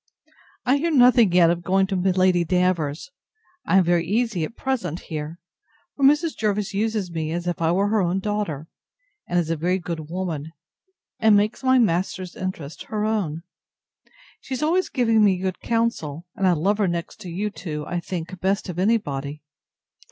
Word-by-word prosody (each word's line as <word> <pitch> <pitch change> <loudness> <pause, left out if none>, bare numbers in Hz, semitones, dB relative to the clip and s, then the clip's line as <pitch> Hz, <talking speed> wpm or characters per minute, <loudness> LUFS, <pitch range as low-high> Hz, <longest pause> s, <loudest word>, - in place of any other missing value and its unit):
I 265 +3 +4
hear 330 +4 0
nothing 245 - +5
yet 170 -1 +5
of 175 0 -2
going 190 +2 +2
to 190 0 -3
Lady 185 -1 +3
Davers; 180 - 0 0.5
and - - +2
I - - +8
am 190 - +6
very 175 -1 +2
easy 210 -1 0
at 195 - -5
present 245 - -2
here: 155 0 -6 0.6
for 280 - -3
Mrs. 300 +4 +4
Jervis 210 -2 -1
uses 210 -2 -1
me 160 -1 -3
as 175 +1 -3
if 175 -1 -2
I 165 0 +2
were 195 +3 +2
her 215 -1 +2
own 180 +1 0
daughter, 190 -8 -3 0.6
and 175 - 0
is 165 -2 +1
a - - +1
very 175 +4 0
good 165 -3 -6
woman, 165 -4 -4 0.7
and 220 -3 +5
makes 210 +5 0
my 260 0 +4
master's 185 -4 0
interest 165 -6 -6
her 215 -1 -2
own. 180 -8 -1 1.0
She 265 - -5
is 260 - -3
always 355 +4 +2
giving 225 -3 +3
me 195 -3 +4
good 185 0 -3
counsel, 205 -10 -1
and 195 - +1
I 180 - +5
love 195 +6 +1
her 200 - +3
next 170 -1 -3
to 190 -4 -8
you 205 +5 -2
two, 150 -6 -6
I 175 +2 -2
think, 175 0 -6
best 195 +1 0
of 175 0 -4
any 220 +5 +4
body. 145 -5 -6
185 Hz, 190 wpm, -23 LUFS, 170-215 Hz, 1.0 s, I